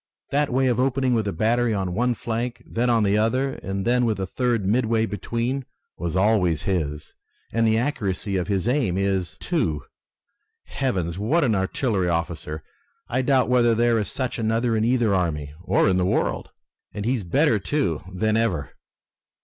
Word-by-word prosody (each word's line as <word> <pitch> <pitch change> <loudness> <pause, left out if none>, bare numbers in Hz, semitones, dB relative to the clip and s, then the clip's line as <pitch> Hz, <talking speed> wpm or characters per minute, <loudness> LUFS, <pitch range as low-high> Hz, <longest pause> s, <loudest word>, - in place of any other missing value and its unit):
That 145 0 +1
way 130 +2 +2
of 125 -2 +1
opening 130 0 +1
with 110 -3 +1
a - - 0
battery 115 +5 +1
on 95 -3 -2
one 120 +5 +1
flank, 120 +2 -4
then 120 +2 -1
on 115 -2 +3
the 100 +1 +2
other, 130 +5 +1
and 95 0 -3
then 125 +1 +3
with 110 -4 0
a 95 - -1
third 120 -1 -1
midway 115 +1 +2
between 115 +6 -2 0.3
was 85 0 -4
always 95 -5 +2
his, 75 -5 -2 0.4
and 115 0 +2
the 110 0 +3
accuracy 105 -6 -1
of 90 +1 -1
aim 100 0 +1
is 100 - +1 0.3
his, - - -23
too! 80 - -1 0.8
Heavens, 95 -10 -2
what 145 +11 +2
an 120 -5 +2
artillery 95 0 0
officer! 80 -2 -3 0.5
I 125 +2 +1
doubt 130 0 +3
whether 120 -2 +3
there 120 0 +3
is 105 - -2
such 130 -2 -3
another 115 +1 +1
in 110 - +1
either 120 -3 +2
army, 75 -6 -1
or 95 - +2
in 95 - +3
the 90 - +2
world! - - 0 0.5
And 105 - -4
he 125 - +2
is 120 -6 -2
better, 115 - +2
too, 95 - -1
than 110 +4 0
ever!" 95 -11 0
110 Hz, 180 wpm, -24 LUFS, 95-125 Hz, 0.8 s, on